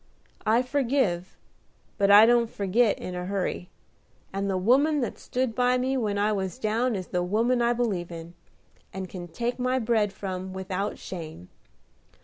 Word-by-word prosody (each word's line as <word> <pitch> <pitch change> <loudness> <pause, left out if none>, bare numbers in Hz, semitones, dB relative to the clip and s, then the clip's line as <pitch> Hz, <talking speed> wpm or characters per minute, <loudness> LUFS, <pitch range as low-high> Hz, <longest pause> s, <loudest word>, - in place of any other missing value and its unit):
I 230 +3 +4
forgive, 250 -9 0 0.6
but 200 0 +3
I 205 +2 +9
don't 235 -1 +3
forgit 205 +3 +1
in 180 - -6
a 180 0 -4
hurry; 190 -2 -2 0.6
and 200 0 -2
the 190 - 0
woman 275 +10 +3
that 240 - -3
stood 255 -2 -2
by 250 +1 +2
me 260 +2 0
when 215 -5 -1
I 205 +1 +2
was 190 0 -2
down 230 +1 0
is 185 -2 -5
the 180 - 0
woman 230 +7 +1
I 235 0 +3
believe 205 -8 -2
in, 165 0 -8 0.6
and 190 0 -5
can 175 -1 -8
take 235 +9 -3
my 255 +1 +1
bread 220 -4 +1
from 190 -1 -5
without 190 +2 -3
shame. 160 - -8
210 Hz, 165 wpm, -26 LUFS, 185-245 Hz, 0.6 s, I